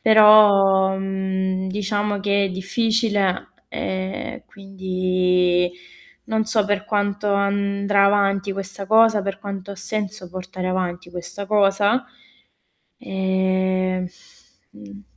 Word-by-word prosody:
però, 200 -3 +6
mhmm, 190 -1 -2
diciamo 205 +1 -2
che 200 0 +1
è - - -3
difficile 205 0 0 0.3
e 190 0 -4
quindi, 185 -2 0 0.6
non 220 0 0
so 220 -1 +1
per 205 0 -1
quanto 205 0 -1
andrà 200 0 +1
avanti 200 -1 +1
questa 195 0 -7
cosa, 220 0 +4
per 195 0 -4
quanto 200 -1 -6
ha - - -11
senso 205 -1 -5
portare 185 0 -6
avanti 180 -1 -3
questa 175 +3 -7
cosa. 205 +3 +2 0.9
Ehm, 185 -1 -1 0.6
mhmm, 100 -1 -13
195 Hz, 105 wpm, -21 LUFS, 185-205 Hz, 0.9 s, però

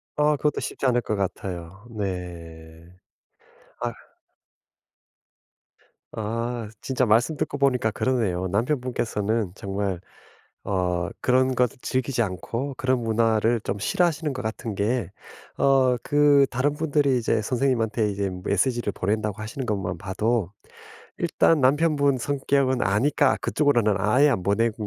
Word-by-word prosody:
아. 150 0 +3
그것도 150 0 0
쉽지 - - -4
않을 120 -1 +3
것 110 - -2
같아요. 95 +1 -5
네. 85 -5 -7 1.0
아휴. - - -2 2.2
아. 115 +1 -3
진짜 130 -1 0
말씀 120 +8 +3
듣고 - - -2
보니까 125 -5 +2
그러네요. 105 -7 0
남편분께서는 115 -3 -1
정말 100 -3 -3 0.6
어 90 -3 -1
그런 130 +1 +2
것 125 0 +3
즐기지 130 -1 -1
않고 115 - -4
그런 130 -1 +1
문화를 115 0 +2
좀 100 - -3
싫어하시는 160 - 0
것 130 - -5
같은 110 -1 -4
게 105 0 -1 0.5
어 130 -2 +4
그 145 -1 +5
다른 135 +4 +1
분들이 145 -3 +1
이제 110 -2 +1
선생님한테 115 -3 0
이제 100 0 -2
메시지를 115 +3 0
보낸다고 105 +2 -2
하시는 125 +4 -5
것만 95 -5 -2
봐도 100 +2 -1 0.7
일단 165 -2 +2
남편분 140 0 +3
성격은 135 0 0
아니까 130 +8 +2
그쪽으로는 120 -8 +2
아예 120 +9 +4
안 120 -10 0
보낸 110 +4 +1
115 Hz, 275 characters per minute, -24 LUFS, 100-135 Hz, 2.2 s, 그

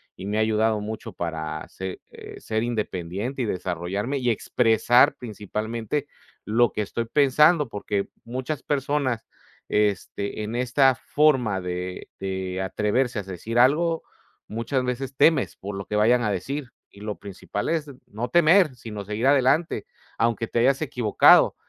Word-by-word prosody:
Y 95 - -8
me 105 +1 -1
ha - - +3
ayudado 110 0 +2
mucho 110 +1 -6
para 80 -3 -4
se, 95 -1 -6
eh, - - -11
ser 110 0 -2
independiente 110 +1 -3
y - - 0
desarrollarme 95 +7 -2
y 125 -2 0
expresar 115 +1 +3
principalmente 110 +5 -4 0.4
lo 115 +2 +3
que 105 - -2
estoy 115 +3 -3
pensando. 150 +4 +4
Porque 100 -2 -3
muchas 130 +5 -4
personas, 140 -4 -1 0.4
este, 105 0 -1
en 110 +3 -4
esta 130 +2 +3
forma 125 -9 +2
de 90 0 -5
de 95 -1 -3
atreverse 105 +5 0
a 100 - -4
decir 95 +5 -5
algo, 160 +7 +3 0.4
muchas 115 +4 -2
veces 130 +2 -3
temes 150 0 +3
por 100 +1 -7
lo 100 0 -5
que 105 - -4
vayan 115 +4 +4
a 105 - +1
decir. 135 +8 -4 0.2
Y 100 - -16
lo 105 -1 -4
principal 100 0 -5
es 160 -3 -1 0.2
no 115 +4 -5
temer, 170 -3 +5
sino 105 -4 -7
seguir 105 +4 -3
adelante, 140 +4 +2 0.3
aunque 115 0 +1
te - - -1
hayas 135 +3 +3
equivocado. 120 -7 +5
115 Hz, 150 wpm, -24 LUFS, 105-130 Hz, 0.4 s, temer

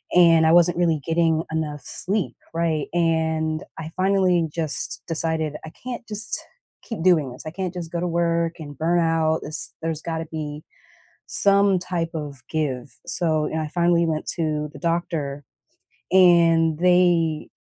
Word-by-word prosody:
and 165 -2 +6
I 160 - +5
wasn't 175 0 +5
really 165 -4 +2
getting 165 -1 +2
enough 150 -2 -3
sleep, 185 - -2 0.2
right? 165 -3 0
And 160 -2 0 0.2
I 160 - -5
finally 185 -3 +2
just 155 -6 -2
decided 160 -2 -1
I 160 - -9
can't 245 -1 -6
just 210 0 -3 0.4
keep 225 -7 -6
doing 160 -8 +3
this. 125 - -10
I - - -2
can't 185 +1 -4
just 170 -2 -6
go 170 - -2
to 180 - -1
work, 170 0 0
and 145 -3 -9
burn 170 +3 +2
out, 165 -1 +2
this 155 - -4
there's 160 -1 -3
gotta 165 -1 -3
be 150 -1 -5 0.6
some 200 -1 +3
type 175 -2 -3
of 145 -4 -6
give. 140 -6 -3
So, 155 -3 0
you - - -6
know, 160 - 0
I 155 - -4
finally 170 0 +2
went 155 -1 -2
to 150 -2 -1
the 145 - -11
doctor, 155 -4 -2 0.7
and 170 -3 +5
they 175 -3 +3
165 Hz, 160 wpm, -23 LUFS, 155-175 Hz, 0.7 s, and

